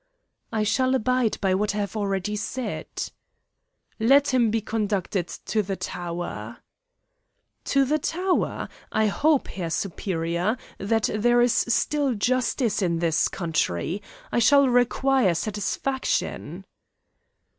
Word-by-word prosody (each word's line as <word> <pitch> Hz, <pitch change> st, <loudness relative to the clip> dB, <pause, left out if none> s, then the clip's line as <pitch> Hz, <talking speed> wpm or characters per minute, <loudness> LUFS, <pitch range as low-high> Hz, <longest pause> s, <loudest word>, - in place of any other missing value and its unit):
"I 220 Hz, -1 st, 0 dB
shall 260 Hz, +4 st, +2 dB
abide 255 Hz, -2 st, +1 dB
by 190 Hz, -2 st, +2 dB
what 205 Hz, +1 st, 0 dB
I -, -, -2 dB
have 205 Hz, +1 st, -3 dB
already 200 Hz, -1 st, -1 dB
said." 245 Hz, +4 st, -4 dB, 1.1 s
"Let 275 Hz, +5 st, +4 dB
him 240 Hz, -3 st, +4 dB
be 225 Hz, +1 st, +1 dB
conducted 205 Hz, -4 st, -1 dB, 0.2 s
to 220 Hz, -, +1 dB
the 195 Hz, -1 st, -3 dB
tower." 170 Hz, -, -5 dB, 1.1 s
"To 275 Hz, -1 st, +3 dB
the 305 Hz, +4 st, +1 dB
tower? 360 Hz, +5 st, -1 dB, 0.2 s
I 220 Hz, -, +2 dB
hope, 285 Hz, +7 st, +2 dB
Herr 175 Hz, -3 st, -4 dB
Superior, 175 Hz, +3 st, -1 dB, 0.2 s
that 225 Hz, +2 st, +1 dB
there 240 Hz, +3 st, +3 dB
is 240 Hz, -1 st, +4 dB
still 275 Hz, +2 st, +1 dB
justice 245 Hz, 0 st, 0 dB
in 170 Hz, -3 st, +1 dB
this 165 Hz, -2 st, +2 dB
country. 165 Hz, -, -1 dB, 0.3 s
I -, -, +2 dB
shall 280 Hz, +3 st, +6 dB
require 245 Hz, -4 st, +3 dB
satisfaction." 220 Hz, -, -2 dB
215 Hz, 120 wpm, -25 LUFS, 190-255 Hz, 1.1 s, shall